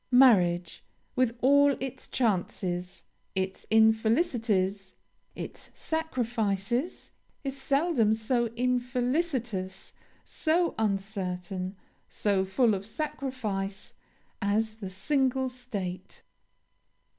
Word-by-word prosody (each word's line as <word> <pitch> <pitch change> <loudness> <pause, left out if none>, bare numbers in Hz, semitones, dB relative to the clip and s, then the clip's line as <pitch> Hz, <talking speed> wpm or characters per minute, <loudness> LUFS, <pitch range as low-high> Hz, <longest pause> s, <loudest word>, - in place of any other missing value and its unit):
Marriage, 180 -10 +4 0.3
with 250 -2 +1
all 285 +1 +5
its 265 0 -5
chances, 180 -5 -1 0.3
its 190 0 -2
infelicities, 220 - +2 0.4
its - - -7
sacrifices, 240 - -1 0.3
is 275 -1 -3
seldom 275 -5 +2
so 235 +2 +1
infelicitous, 250 - -1 0.3
so 340 +2 +1
uncertain, 195 -3 -2 0.3
so 200 -2 +1
full 210 +4 +3
of 195 -1 -2
sacrifice, 215 -6 -4 0.5
as 215 +1 0
the 195 -4 -6
single 260 +6 +1
state. 200 -8 -6
220 Hz, 80 wpm, -29 LUFS, 195-260 Hz, 0.5 s, all